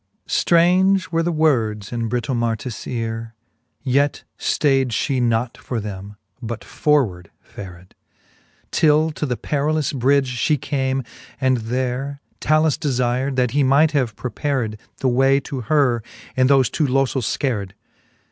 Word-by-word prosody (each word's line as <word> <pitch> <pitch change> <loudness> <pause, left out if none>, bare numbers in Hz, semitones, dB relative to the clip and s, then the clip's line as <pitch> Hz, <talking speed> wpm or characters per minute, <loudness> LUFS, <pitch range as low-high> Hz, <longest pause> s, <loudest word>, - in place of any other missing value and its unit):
xxxvin. - - -10
Strange 185 +2 +3
were 165 0 +1
the 175 +1 0
words 115 - +1
in 115 -2 -2
Britomartis 115 -1 -2
eare; 115 -1 -4 0.5
Yet 140 +2 +1 0.2
ftayd 135 -3 +2
fhe 125 +3 0
not 115 0 0
for 120 - -4
them, 100 -1 -7 0.3
but 115 -1 -5
forward 110 - 0
fared, 90 -2 -11 0.8
Till 155 +1 +3
to 150 0 -3
the 125 -2 -2
perillous 150 +1 -1
bridge 135 -1 +1
fhe 150 +2 +2
came, 135 -1 -1 0.4
and 130 -1 +2
there 125 +4 -3 0.2
Talus 155 -1 +2
defir'd, 130 -1 0
that 125 -2 +1
he 145 +3 +2
might 140 +4 +4
have 130 -8 0
prepared 120 -1 -2 0.2
The 135 - -1
way 135 +2 +4
to 135 -3 -5
her, 125 -2 +2 0.3
and 130 0 +3
thofe 135 -5 +4
two 150 - +1
lofels 130 -2 0
feared. 105 -8 -2
130 Hz, 140 wpm, -21 LUFS, 115-145 Hz, 0.8 s, might